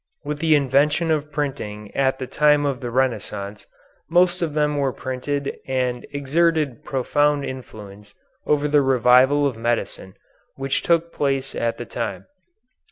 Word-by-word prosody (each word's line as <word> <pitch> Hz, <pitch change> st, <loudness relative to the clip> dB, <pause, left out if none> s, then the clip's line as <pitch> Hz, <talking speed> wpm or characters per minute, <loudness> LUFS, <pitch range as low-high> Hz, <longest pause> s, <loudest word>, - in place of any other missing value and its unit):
With 150 Hz, 0 st, -4 dB
the 160 Hz, -1 st, +4 dB
invention 145 Hz, +4 st, +2 dB
of 150 Hz, -1 st, -1 dB
printing 120 Hz, -8 st, -4 dB
at 135 Hz, -1 st, +1 dB
the 130 Hz, -, -4 dB
time 150 Hz, +2 st, +3 dB
of 135 Hz, -3 st, -1 dB
the 120 Hz, -, -5 dB
Renaissance 115 Hz, -5 st, -2 dB, 0.4 s
most 180 Hz, +1 st, +3 dB
of 160 Hz, -3 st, -2 dB
them 150 Hz, -1 st, +1 dB
were 135 Hz, -2 st, +1 dB
printed 135 Hz, +3 st, -4 dB
and 125 Hz, -2 st, -1 dB
exerted 150 Hz, -1 st, 0 dB
profound 145 Hz, +1 st, +1 dB
influence 105 Hz, -6 st, -10 dB, 0.3 s
over 150 Hz, 0 st, +2 dB
the 145 Hz, 0 st, +4 dB
revival 130 Hz, +2 st, +4 dB
of 130 Hz, -5 st, -1 dB
medicine 115 Hz, -5 st, -3 dB, 0.4 s
which 135 Hz, 0 st, -1 dB
took 170 Hz, 0 st, +1 dB
place 135 Hz, -2 st, -1 dB
at 115 Hz, 0 st, -1 dB
that 120 Hz, -, -8 dB
time. 115 Hz, -2 st, -4 dB
135 Hz, 145 wpm, -22 LUFS, 125-150 Hz, 0.4 s, the